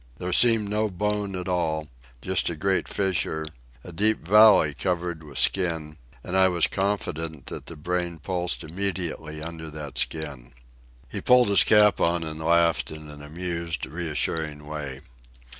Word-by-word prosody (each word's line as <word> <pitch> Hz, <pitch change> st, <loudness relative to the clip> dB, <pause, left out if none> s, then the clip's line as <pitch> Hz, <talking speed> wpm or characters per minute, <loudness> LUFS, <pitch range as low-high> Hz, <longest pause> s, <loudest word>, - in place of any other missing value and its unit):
There 90 Hz, 0 st, -3 dB
seemed 115 Hz, 0 st, +5 dB
no 105 Hz, +1 st, 0 dB
bone 105 Hz, +1 st, -2 dB
at 90 Hz, 0 st, -5 dB
all, 80 Hz, -4 st, -1 dB, 0.4 s
just 95 Hz, -1 st, +1 dB
a 85 Hz, -, -3 dB
great 95 Hz, +4 st, 0 dB
fissure, 90 Hz, -5 st, -1 dB, 0.4 s
a 90 Hz, -, -9 dB
deep 105 Hz, 0 st, 0 dB
valley 105 Hz, -7 st, +7 dB
covered 85 Hz, +1 st, -2 dB
with 75 Hz, -4 st, -10 dB
skin; 80 Hz, -5 st, +1 dB, 0.3 s
and 90 Hz, -, -4 dB
I 95 Hz, 0 st, +6 dB
was 85 Hz, -3 st, +2 dB
confident 80 Hz, -7 st, -2 dB
that -, -, -7 dB
the 85 Hz, -, -7 dB
brain 85 Hz, +2 st, -2 dB
pulsed 90 Hz, +2 st, -2 dB
immediately 85 Hz, -3 st, -4 dB
under 80 Hz, -1 st, -7 dB
that 75 Hz, -2 st, -6 dB
skin. 70 Hz, -7 st, -3 dB, 0.5 s
He -, -, -6 dB
pulled 125 Hz, -3 st, +5 dB
his 100 Hz, -, +5 dB
cap 105 Hz, -3 st, +5 dB
on 85 Hz, 0 st, +2 dB
and 80 Hz, -1 st, -6 dB
laughed 85 Hz, -6 st, +3 dB
in 75 Hz, -1 st, -9 dB
an 75 Hz, 0 st, -11 dB
amused, 85 Hz, +2 st, -4 dB
reassuring 75 Hz, 0 st, -3 dB
way. 75 Hz, -3 st, -6 dB
85 Hz, 155 wpm, -25 LUFS, 80-95 Hz, 0.5 s, valley